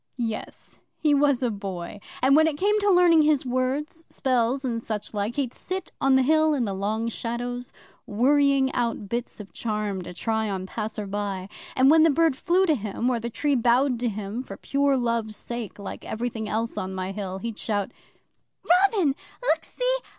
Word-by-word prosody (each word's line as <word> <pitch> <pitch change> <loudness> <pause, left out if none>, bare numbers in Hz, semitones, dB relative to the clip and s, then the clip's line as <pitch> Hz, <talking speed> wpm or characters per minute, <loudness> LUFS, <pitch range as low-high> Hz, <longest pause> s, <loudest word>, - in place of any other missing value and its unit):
'Yes, 225 -3 -5 0.2
he 300 -2 +2
was 280 -2 +3
a 245 - +1
boy. 195 -2 -6 0.2
And 270 +2 +6
when 315 +1 +6
it 300 -2 -1
came 420 +5 +2
to 410 0 +2
learning 355 -3 +6
his 300 -3 +3
words 265 +6 -2
spells 255 +1 0
and 230 -2 -1
such 215 -2 -4
like 210 +3 -2
he'd 265 -4 -1
sit 370 -1 -5
on 270 -1 +4
the 265 - +4
Hill 310 +2 +3
in 250 -4 0
the 200 - -2
long 215 +4 -1
shadows, 245 +2 -4 0.4
worrying 275 +4 +3
out 230 -4 -1
bits 235 +1 -4
of 205 -2 -10
charms 210 -4 -2
to - - -7
try 220 +3 -1
on 190 -2 -3
passersby. 205 -2 -4 0.3
And 265 +2 +5
when 320 0 +6
the 325 - +6
bird 320 -1 +3
flew 360 +7 +2
to 320 - +3
him, 225 0 -1
or 240 - 0
the 235 +1 -4
tree 290 +5 0
bowed 245 +1 +3
to 240 0 0
him 210 +2 -4
for 200 -7 -9
pure 280 -1 +1
love's 230 -3 -1
sake 235 -3 -6
(like 200 - -7
everything 225 -1 -4
else 225 +2 -2
on 190 0 -4
my 185 0 -3
Hill), 195 -2 -4
he'd 225 +2 -5
shout, 205 -3 -1 0.8
"Robin! 375 -1 +4 0.4
Look - - +2
see! - - -1
240 Hz, 185 wpm, -25 LUFS, 215-285 Hz, 0.8 s, And